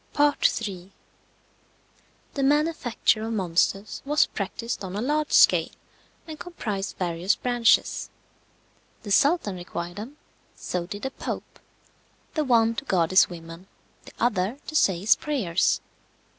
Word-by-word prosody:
III. 205 -10 +1 1.4
The 280 - -2
manufacture 280 -6 +1
of 225 +1 -3
monsters 195 +1 0
was 295 +2 +3
practised 215 +2 -5
on 190 0 -6
a - - -2
large 300 +4 0
scale, - - +5 0.6
and 315 -2 -9
comprised 210 - -5
various 175 +2 0
branches. 245 -2 +2 0.9
The 205 - -6
Sultan 280 - +3
required 175 0 -6
them, 245 +8 -8 0.4
so 175 -1 -4
did 205 +1 -7
the 265 - -2
Pope; - - -6 0.7
the 310 - 0
one 230 -4 +3
to - - -4
guard 175 -8 +1
his 185 - +6
women, 165 +1 -10 0.4
the - - -13
other 220 0 0
to 310 - -7
say 190 - +3
his 210 +2 +5
prayers. 210 - 0
215 Hz, 130 wpm, -25 LUFS, 185-275 Hz, 1.4 s, his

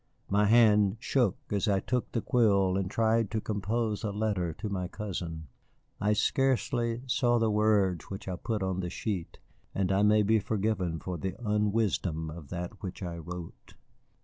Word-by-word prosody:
My 105 +1 +4
hand 105 -2 +5
shook 120 -5 +1 0.2
as 105 +2 0
I 100 -2 +3
took 125 +4 -2
the 115 - -2
quill 100 -6 +3
and 95 -1 -1
tried 110 0 +2
to 110 - -1
compose 110 +1 -2
a 110 - 0
letter 100 -4 -1
to 110 - -6
my 95 -3 -2
cousin. 85 -6 -5 0.5
I 105 +1 +2
scarcely 120 -1 +1
saw 125 -2 +2
the 115 -1 +2
words 105 -5 +2
which 95 0 -8
I 95 - -2
put 105 +2 -3
on 95 -1 -1
the 90 -1 -2
sheet, 95 -1 -4 0.4
and 95 -1 +1
I 95 +1 +3
may 105 +1 +5
be 110 +2 +3
forgiven 100 -5 -1
for 90 0 -5
the 95 +4 -3
unwisdom 105 -7 0
of 75 -3 -10
that 90 +3 -6
which 95 0 -6
I 85 -1 -5
wrote. 85 +1 -9
105 Hz, 175 wpm, -29 LUFS, 90-110 Hz, 0.5 s, hand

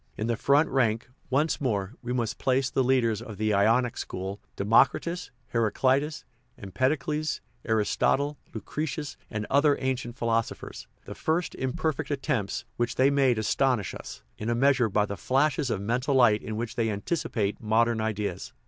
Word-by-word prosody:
In 110 - -2
the 120 0 0
front 140 +7 +3
rank, 115 -3 0 0.2
once 150 +5 +1
more, 105 -6 -1
we 125 - -4
must 120 -3 -2
place 130 0 +1
the 130 - +2
leaders 120 -4 +2
of 110 -4 -8
the 110 0 +1
Ionic 115 +4 +2
school, 95 +2 -5
with - - -40
Democritus, 135 - +2 0.2
Heraclitus, 130 +6 +1 0.3
Empedocles, 150 - -1 0.3
Aris 110 -2 +1
totle, 145 +2 +2 0.2
Lucretius, 150 -1 -4
and 105 -1 -3
other 145 +1 +4
ancient 125 -2 -2
philosophers. 115 -2 -2 0.2
The - - -7
first 165 +2 -1
imperfect 135 +4 -2
attempts 135 -8 -2
which 120 0 -1
they 135 +2 +4
made 135 -4 +3
astonish 115 0 +1
us, 60 - -9 0.2
in 110 - -3
a 120 - +1
measure, 130 -2 +3
by 105 +1 +2
the 100 - -5
flashes 140 - +1
of 110 - -1
mental 125 +7 0
light 115 -5 +5
in 110 - -5
which 115 0 -3
they 115 -2 0
anticipate 105 -2 -2
modern 115 +1 +2
ideas. 105 -4 -3
120 Hz, 160 wpm, -27 LUFS, 110-135 Hz, 0.3 s, light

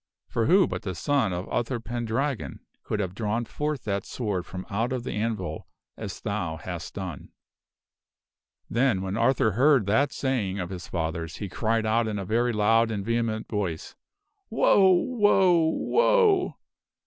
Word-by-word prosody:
For 115 - 0
who 185 +4 +6
but - - -4
the 95 -3 -4
son 135 - +1
of 90 +1 -4
Uther 120 +1 -1
Pendragon 120 - -3 0.2
could 105 - -3
have 95 -3 -2
drawn 110 +3 -2
forth 150 +2 -3
that 100 -2 -2
sword 100 -8 -3
from 90 0 -7
out 115 +4 -1
of 130 -2 -2
the - - -4
anvil 105 -4 -3 0.3
as - - -7
thou 80 -1 -3
hast 85 -4 -7
done? 90 -7 -6 0.7
" - - -61
Then, 120 -5 +1
when 95 +1 -3
Arthur 115 -1 +2
heard 130 +1 +4
that 135 +8 +2
saying 115 -8 -1
of 90 0 -4
his 90 -2 -7
father's, 80 -1 -3
he 100 - -5
cried 110 +3 0
out 110 +1 +2
in 105 -1 -2
a 100 - -4
very 120 +5 +1
loud 115 +1 +3
and 100 -3 -3
vehement 115 -1 -1
voice, 95 -7 -3 0.5
"Woe! 190 -2 +5
Woe! 190 -5 +3
Woe!" 430 - +3
110 Hz, 160 wpm, -26 LUFS, 95-130 Hz, 0.7 s, who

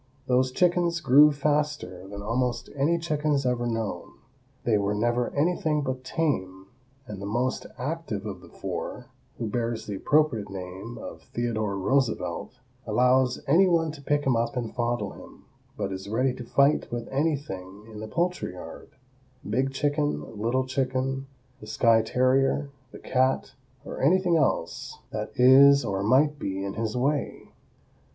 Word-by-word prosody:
Those 130 0 +2
chickens 175 +1 +2
grew 150 0 +7
faster 145 -10 -1
than 100 +1 -8
almost 120 +2 -1
any 150 +5 +2
chickens 150 -4 0
ever 120 -1 0
known. 110 -10 -3 0.5
They 115 - +2
were 100 +1 0
never 120 +3 +1
anything 155 -1 +1
but 130 -1 -3
tame, 95 - -2 0.4
and 105 -4 -8
the 100 - -4
most 120 +5 -1
active 130 -7 -4
of 95 -4 -6
the - - -14
four, - - -6 0.3
who 115 - -3
bears 115 0 -2
the 105 - -5
appropriate 140 -7 +2
name 95 +4 -7
of - - -8
Theodore 110 -4 -2
Roosevelt, 125 0 -1 0.3
allows 125 +3 +3
any 175 +7 +5
one 165 -3 +2
to 150 -2 -11
pick 145 +1 0
him 130 -3 +3
up 115 +2 -1
and 120 -2 -3
fondle 120 0 -1
him, - - -14 0.3
but 100 - -2
is 95 +1 -6
ready 125 +4 +1
to 125 - -8
fight 140 +5 +2
with 120 -1 -4
anything 105 - -3
in 110 -1 -10
the 110 - -6
poultry 175 - -1
yard—big 130 +6 -6
chicken, 145 -2 -1
little 120 +5 0
chicken, 130 +1 -1 0.3
the 105 - -11
skye 115 +1 +4
terrier, 135 +4 +1 0.2
the - - -10
cat 130 0 0 0.3
or - - -6
anything 175 +4 +3
else 130 - -1
that - - -4
is 135 +2 +7
or 95 -3 -1
might 140 +7 +3
be 95 0 -3
in 100 - -4
his 110 +2 -2
way. 140 +3 -1
130 Hz, 150 wpm, -26 LUFS, 110-145 Hz, 0.5 s, grew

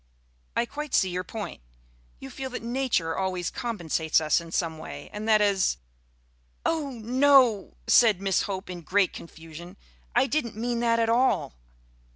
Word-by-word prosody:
"I 235 - +2
quite 295 +3 -4
see 190 -2 +3
your 180 +1 -2
point. 210 - -7 0.6
You - - -9
feel 265 -1 -5
that 250 - -6
Nature 235 -9 0
always 185 -2 -2
compensates 170 - 0
us 155 +1 +2
in 165 -1 -11
some 165 -2 -1
way, - - -9
and 215 +2 -4
that 215 -1 +5
as 195 - +2 0.4
" - - -39
"Oh, 315 -4 0
no!" 250 - +3
said 220 -6 +5
Miss 195 -1 +1
Hope 190 0 -4
in 175 -1 -7
great 190 +3 +1
confusion. 170 +3 -11 0.4
"I 245 +2 +5
didn't 260 -6 -2
mean 235 +1 -1
that 230 -1 +2
at 230 -1 +1
all." 245 - +2
205 Hz, 165 wpm, -26 LUFS, 170-240 Hz, 0.6 s, that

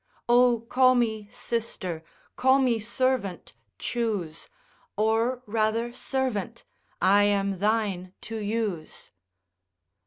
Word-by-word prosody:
O 240 -1 +4
call 255 +2 +4
me 220 -4 0
sister, 190 -10 -4 0.3
call 260 +1 +4
me 250 -4 +2
servant, 235 -4 -1 0.2
choose, 205 - -3 0.5
Or 225 +4 +1
rather 225 +2 0
servant, 245 -4 -3 0.4
I 205 +1 +5
am 200 -2 0
thine 205 -3 0
to 225 - -6
use. 210 -6 -4
225 Hz, 95 wpm, -26 LUFS, 200-240 Hz, 0.5 s, I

